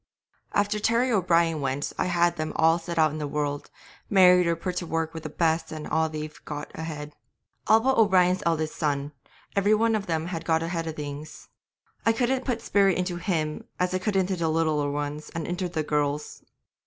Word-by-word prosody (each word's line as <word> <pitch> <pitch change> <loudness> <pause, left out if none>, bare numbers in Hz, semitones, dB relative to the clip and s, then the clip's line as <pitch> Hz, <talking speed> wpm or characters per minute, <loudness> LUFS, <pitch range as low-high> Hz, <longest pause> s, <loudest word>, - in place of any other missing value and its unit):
'After 205 +1 +1
Terry 235 +4 +2
O'Brien 170 -6 +2
went 135 +1 -2
I - - 0
had 175 -1 +2
them 155 0 -3
all 165 +1 +4
set 170 0 -6
out 155 -1 +4
in 155 - -5
the 150 - -2
world, 145 0 -3 0.4
married 180 -2 +6
or 170 - +2
put 180 +2 -4
to 175 - -3
work 165 0 -2
with 160 - -6
the 155 - -6
best, 160 +1 0
and 155 -1 -6 0.3
they've 155 0 -7
got 150 0 -6
ahead. 150 -2 -6 0.5
All 220 +1 +6
but 265 +2 +2
O'Brien's 185 -4 +4
eldest 160 -2 0
son, 145 -2 -1 0.4
every 205 +2 +4
one 225 +1 +2
of 210 -2 -1
them 160 -1 -1
have 170 -2 -4
got 160 -1 +1
ahead 165 -1 -3
of 160 - -4
things. 150 +1 -8 0.5
I 225 - +3
couldn't 255 +2 0
put 245 -3 -1
the - - -14
spirit 195 -3 +3
into 180 -1 -2
him 160 -4 -2
as 180 0 0
I 185 - +1
could 205 +2 -2
into 190 0 +1
the 165 -2 -1
littler 155 -2 +1
ones 145 +1 -4
and 165 -2 -3
into 180 +1 -2
the 160 -3 -2
girls. 150 0 -2
165 Hz, 205 wpm, -26 LUFS, 155-185 Hz, 0.5 s, married